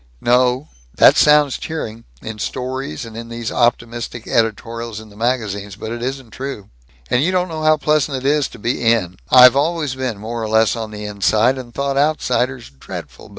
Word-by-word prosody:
"No. 125 +3 +2 0.3
That - - +7
sounds 150 -2 +4
cheering, 115 -8 -6 0.2
in 110 -1 -6
stories 130 - -4
and 115 +1 -9
these 115 -1 -4
optimistic 120 -1 -1
editorials 115 0 -1
in 110 0 -12
the 100 - -17
magazines, 105 -4 -2
but 110 +2 -7
it 120 0 -5
isn't 130 -2 -4
true. 130 - -7 0.4
And 125 - +3
you 180 - +1
don't 180 -1 0
know 160 -1 -5
how 155 0 +4
pleasant 150 -2 +1
it 130 - -7
is 145 0 +2
to - - -13
be 120 +3 -2
In. 110 -6 +1
I've 125 0 +8
always 150 -1 0
been 130 -4 -3
more 115 +3 -5
or 110 - -3
less 110 +1 +3
on 110 -2 -5
the 105 0 -7
inside, 110 +5 +2
and 120 -2 -9
thought 140 +2 -2
outsiders 130 - 0
dreadful. 65 - -10
120 Hz, 185 wpm, -19 LUFS, 110-135 Hz, 0.4 s, I've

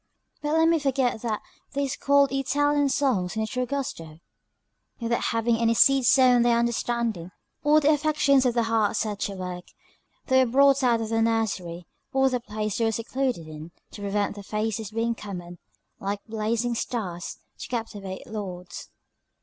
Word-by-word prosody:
But 295 0 -1
let 320 0 +4
me 330 0 +4
not - - -5
forget 265 -5 0
that 220 -3 -2 0.3
they 280 0 0
squalled 280 0 +2
Italian 285 +1 +1
songs 230 -11 0
in 220 - -1
the - - -2
true 250 +2 -2
gusto. 165 - -4 0.8
Without 235 0 -1
having 230 0 +1
any 230 0 +2
seeds 270 0 +5
sown 255 -2 +6
in - - +3
their 235 0 +3
understanding, 235 -5 -1 0.3
or 300 +1 +5
the 305 0 +4
affections 295 -3 +3
of 245 - 0
the 235 - +3
heart 225 -2 +1
set 210 -1 -2
to 200 0 -3
work, 180 -1 -6 0.6
they 260 -1 +4
were 250 - -1
brought 275 +1 +5
out 240 -3 +2
of 220 - -3
their 225 0 +1
nursery, 195 -7 -1 0.3
or 265 0 +3
the 250 - 0
place 215 -2 -4
they 230 - +2
were 225 - +2
secluded 235 -5 -2
in, 155 +1 -9 0.2
to 205 - -10
prevent 200 0 -1
their 205 0 -9
faces 215 +1 -2
being 230 +2 -1
common; 180 -5 -8 0.4
like 200 +1 -4
blazing 225 +2 -1
stars, 200 -7 -4 0.2
to - - -6
captivate 205 -5 -5
Lords. 180 -4 -7
230 Hz, 175 wpm, -26 LUFS, 205-265 Hz, 0.8 s, sown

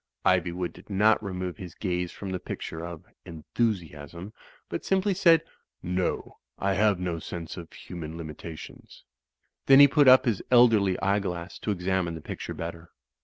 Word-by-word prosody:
Ivywood 90 0 +1
did - - -16
not 105 +2 +3
remove 90 -2 -4
his 90 -5 -9
gaze 90 -2 -2
from 100 -2 -7
the 90 - -2
picture 80 -1 -6
of 85 -2 -7 0.2
"Enthusiasm," 85 -1 -4 0.3
but - - -5
simply 195 +1 +1
said 170 -3 +5 0.4
"No; 90 +1 -2 0.2
I 100 0 0
have 100 -1 +2
no 90 -2 -2
sense 85 0 -7
of 85 -3 -9
human 80 -2 -8
limitations." 80 0 -10 0.6
Then 135 0 +8
he 140 - +10
put 145 0 +4
up 130 0 +8
his 115 -6 0
elderly 115 -6 +5
eyeglass 95 -2 -1
to - - -5
examine 90 -3 -1
the 80 - -8
picture - - -6
better. 85 0 -7
90 Hz, 155 wpm, -27 LUFS, 85-105 Hz, 0.6 s, he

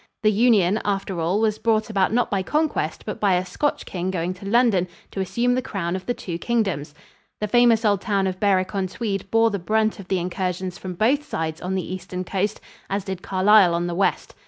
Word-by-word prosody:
The 215 - +5
union, 210 -3 +3
after 195 -3 -2
all, 175 +5 +1
was 215 -1 +1
brought 220 -1 +1
about 195 -3 +2
not 245 +2 +1
by 195 -2 +1
conquest 295 - -1
but 210 - -5
by 200 -3 +3
a 180 +1 0
Scotch 290 +9 -2
king 180 0 -3
going 180 -1 -2
to 195 +2 -10
London 220 -6 +3 0.2
to - - -5
assume 235 +7 +1
the 255 - +1
crown 185 -6 -3
of 185 - -6
the 245 - +1
two 170 -2 -5
kingdoms. 190 -11 -1 0.4
The 210 - -1
famous 235 0 +4
old 205 -2 +2
town 200 -3 0
of 185 -1 -2
Berwick 190 -2 +2
on 195 -2 -1
Tweed 195 -1 -4
bore 225 0 +3
the 200 - -2
brunt 215 +4 0
of 195 - -9
the 190 - +1
incursions 180 0 -3
from 185 -1 -6
both 260 +10 +2
sides 160 - -4
on 185 +1 -2
the 185 - -2
eastern 185 0 -5
coast, 200 +3 -2 0.3
as 195 0 -1
did 190 -2 -5
Carlisle 190 -2 +4
on 170 +1 -1
the 175 - -2
west. 190 +3 0
195 Hz, 220 wpm, -23 LUFS, 185-215 Hz, 0.4 s, The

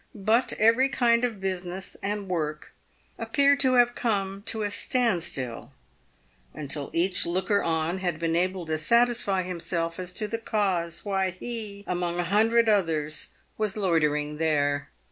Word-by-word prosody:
But 220 +5 +1
every 230 +5 +4
kind 235 -2 +2
of 230 -5 -1
business 185 -1 -4
and 205 0 -3
work 155 -4 -3 0.5
ap 225 0 -7
peared 280 +2 +4
to 260 -2 +3
have 245 -1 +5
come 195 -5 -1
to 220 -1 0
a 205 - -2
stand 225 -2 +1
still 130 -7 -3 0.8
until 145 -1 -5
each 185 +3 +2
looker 190 +4 +1
on 165 +2 -1
had 175 -4 -2
been 165 0 -1
able 185 0 0
to 155 -1 -2
satisfy 230 0 +2
himself 170 -1 -3
as 180 -1 -4
to 215 +3 -2
the 230 +2 -3
cause 190 -7 -1
why 195 -2 0
he, 205 +1 -6
among 175 -1 -2
a - - +2
hundred 225 +5 +3
others, 165 -7 0 0.3
was 215 0 -1
loitering 150 -6 +1
there. 145 -3 0
190 Hz, 155 wpm, -26 LUFS, 165-220 Hz, 0.8 s, have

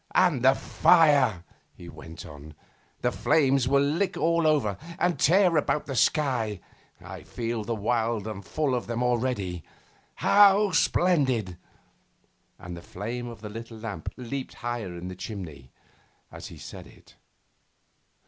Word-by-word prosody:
'And 175 -9 +3
the 130 +2 +5
fire!' 145 - +3 0.3
he 85 - -12
went 80 0 -10
on. 75 0 -12 0.5
'The - - +1
flames 135 -4 +2
will 140 +1 +3
lick 170 +7 0
all 170 0 +2
over, 140 -10 +2 0.2
and 175 -5 0
tear 180 +2 +4
about 150 0 0
the 135 - -5
sky. 120 - +1 0.4
I - - -10
feel 115 -1 -4
wild 115 0 -1
and 105 -3 -6
full 145 - -1
of 125 - -2
them 120 +1 -2
already! 120 -8 -1 0.5
How 205 0 +5
splendid!' 135 - +1 1.0
And 90 0 -8
the 85 - -9
flame 120 +8 -6
of 115 -3 -10
the 105 - -7
little 115 +1 -8
lamp 110 -7 -6
leaped 130 +2 -6
higher 120 -7 -5
in 85 +1 -7
the 90 - -7
chimney 80 - -8 0.6
as - - -9
he - - -11
said - - -10
it. - - -20
120 Hz, 140 wpm, -26 LUFS, 105-150 Hz, 1.0 s, the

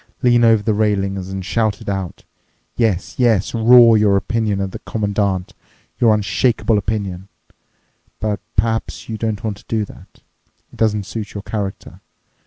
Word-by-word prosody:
Lean 120 -1 +4
over 110 -2 +4
the 110 - +1
railing 100 -2 0
and 95 0 -5
shout 110 0 0
it - - -13
out—yes, 95 +2 -4
yes, 115 -6 +2
roar 115 0 +7
your 105 -2 +4
opinion 110 -1 -1
at 95 -1 -2
the - - -7
Commandant, 100 -3 -2 0.5
your 115 -2 +5
unshakeable 105 +2 +1
opinion. 100 -3 -4 0.9
But 105 -1 -2 0.2
perhaps 110 +2 -1
you 110 -1 -4
don't 110 -2 -2
want 105 -3 -3
to 115 - -18
do 110 -2 -1
that. - - -17 0.5
It - - -14
doesn't 105 -2 +1
suit 105 +1 -6
your 100 - -5
character. 100 -4 -5
105 Hz, 150 wpm, -19 LUFS, 100-115 Hz, 0.9 s, roar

